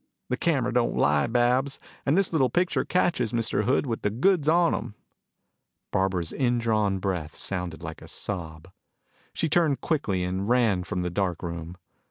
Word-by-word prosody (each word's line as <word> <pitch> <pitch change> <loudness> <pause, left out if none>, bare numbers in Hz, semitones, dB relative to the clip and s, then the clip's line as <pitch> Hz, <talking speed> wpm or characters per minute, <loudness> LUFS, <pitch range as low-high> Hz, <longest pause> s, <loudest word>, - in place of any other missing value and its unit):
The 125 - +1
camera 135 -8 +1
don't 120 -1 +1
lie, 70 0 +3
Babs. 125 +3 +1 0.3
And 145 +6 +3
this 195 -3 +2
little 135 -5 +3
picture 180 +1 +1
catches 170 -11 +1
Mr. 115 -2 0
Hood 130 +3 +2
with 115 -4 -3
the 105 - +1
goods 150 - +2
on 170 +1 +4
him." 105 - -4 1.0
Barbara's 95 -3 0
indrawn 115 -6 +1
breath 90 -5 -3
sounded 90 -3 -4
like 80 -1 -7
a - - -11
sob. 85 -3 -6 0.6
She 165 - -1
turned 155 -3 +2
quickly 105 - 0
and 95 +3 -2
ran 115 -7 +3
from 90 -4 -2
the 90 -1 -2
dark 90 -2 -1
room. 85 0 -6
110 Hz, 165 wpm, -26 LUFS, 90-135 Hz, 1.0 s, on